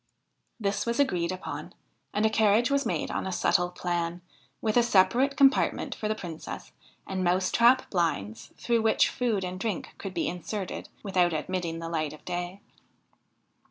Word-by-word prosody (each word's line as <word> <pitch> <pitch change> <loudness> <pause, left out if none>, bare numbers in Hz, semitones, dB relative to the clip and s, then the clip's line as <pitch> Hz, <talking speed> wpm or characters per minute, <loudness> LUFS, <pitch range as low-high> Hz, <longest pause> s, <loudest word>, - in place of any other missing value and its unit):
This 200 0 -1
was 235 +2 0
agreed 180 -12 +2
upon 185 0 -6 0.4
and 210 +1 +1
a - - +5
carriage 220 +3 +3
was 280 0 +2
made - - -1
on - - -2
a - - -2
subtle 175 0 +2
plan, 175 -1 -2 0.4
with 215 -1 0
a 240 - +6
separate 240 +6 +3
compartment 275 -1 +3
for 215 - -4
the 215 - 0
Princess, 170 -6 -7 0.3
and 190 -1 -2
mouse 185 +1 +2
trap 245 +3 +5
blinds 115 - -1
through 235 -1 +1
which 220 0 +3
food 225 -6 0
and 180 +1 -5
drink 205 -3 -3
could 190 -2 -6
be 170 - 0
inserted 185 +2 -5
without 180 -4 +2
admitting 170 +1 -2
the 165 0 -5
light 155 -3 -2
of 155 - -14
day. 175 +3 -4
190 Hz, 165 wpm, -28 LUFS, 175-220 Hz, 0.4 s, a